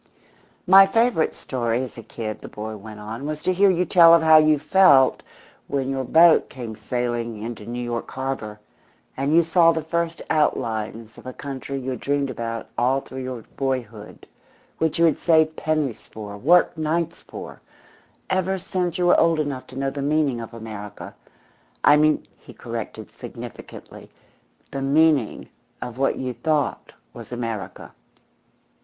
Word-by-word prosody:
"My 195 +1 +8
favourite 225 -4 +1
story 120 -1 -2
as 130 - -8
a 115 - -8
kid," 110 -1 -6
the - - -9
boy 110 +1 -7
went 105 +1 -10
on, 110 +7 -6
"was 155 0 -4
to 185 - +1
hear 195 +2 +4
you 180 -1 +1
tell 170 -2 +7
of 165 - +2
how 160 0 +7
you 155 -1 +5
felt 140 -5 +5 0.5
when 135 -1 -2
your 135 -1 -2
boat 165 +5 +5
came 120 -5 -7
sailing 120 -2 -3
into 115 -2 -7
New 120 +1 -4
York 120 -1 -4
Harbour, 130 -6 -5 0.6
and 135 +2 -1
you 170 +2 +5
saw 165 0 +4
the 160 -1 -3
first 170 +1 -2
outlines 115 -7 -1
of - - -13
a 130 - -6
country 140 0 -6
you 130 0 -4
had 125 - -5
dreamed 140 -1 -1
about 115 -2 -5
all 130 +3 +2
through 130 0 -8
your 130 -3 -6
boyhood, 120 -6 -4 0.5
which 160 -1 0
you 170 - +4
had 160 - +2
saved 160 -2 +3
pennies 155 -7 -2
for, 105 -2 -9
worked 165 +8 +3
nights 165 +2 -1
for, - - -10 0.7
ever 190 0 0
since 180 -2 -2
you 180 - +1
were 175 - +5
old 165 -1 +3
enough 140 -4 -3
to 130 - -11
know 135 0 -1
the 140 - -5
meaning 145 -4 0
of 115 - -8
America. 105 -3 -9 0.7
I 145 - +7
mean," 155 0 +2
he - - -15
corrected, - - -7
significantly, - - -10 0.6
"the 135 - -4
meaning 145 -3 +2 0.3
of 125 0 -7
what 135 - +1
you 130 -1 -3
thought 150 +5 -1 0.2
was - - -11
America. 115 -4 -5
135 Hz, 165 wpm, -23 LUFS, 115-160 Hz, 0.7 s, My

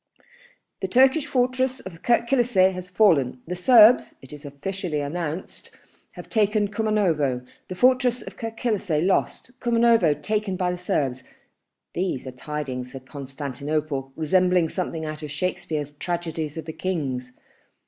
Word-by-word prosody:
"The - - -1
Turkish 265 +4 +4
fortress 255 +1 0
of 175 -3 -10
Kirk 235 0 +2
Kilisseh 235 -8 +3
has 185 0 -7
fallen... 165 - +3
The 180 - -4
Serbs, 225 +4 +6
it 135 - -12
is 145 0 -11
officially 155 +3 -4
announced, 155 +3 -5 0.4
have - - -10
taken 210 -2 +1
Kumanovo... 180 - 0 0.2
The 185 - -6
fortress 250 +2 +3
of - - -10
Kirk 225 -1 -6
Kilisseh 195 -9 0
lost, 195 +5 0
Kumanovo 230 - +3
taken 210 +2 -1
by 180 -1 0
the 180 - -4
Serbs, 135 -8 -1 0.7
these 175 -8 -2
are 130 - -5
tiding 130 -1 -5
for 125 +2 -9
Constantinople 140 +1 -4
resembling 180 +1 +2
something 165 -3 -3
out 155 0 -6
of 150 - -6
Shakspeare's 155 -2 -3
tragedies 165 -3 -3
of 160 - -5
the 160 - -6
kings 135 -10 -3
175 Hz, 140 wpm, -24 LUFS, 145-215 Hz, 0.7 s, Serbs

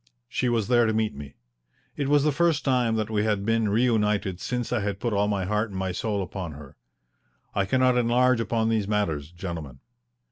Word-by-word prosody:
She 125 - -1
was 115 -3 0
there 120 -1 +4
to 110 - +1
meet 110 -1 0
me. 70 0 -10 0.6
It 140 -2 -2
was 145 -1 +4
the 150 - +3
first 160 -1 +1
time 125 -4 +2
that 110 0 -2
we 105 -1 +1
had 105 -2 0
been 115 -1 +1
reunited 105 -4 +1
since 120 +4 -3
I - - +1
had 100 -1 -3
put 120 0 -1
all 100 0 +2
my 100 -3 -1
heart 105 +3 0
and 95 - -7
my 95 -1 -2
soul 100 +2 -2
upon 90 -3 -6
her. 70 -2 -12 0.8
I 100 - +1
cannot 130 +2 +3
enlarge 125 +1 +3
upon 115 0 0
these 110 -3 0
matters, 85 -8 -1
gentlemen. 85 -7 -6
110 Hz, 205 wpm, -26 LUFS, 95-120 Hz, 0.8 s, there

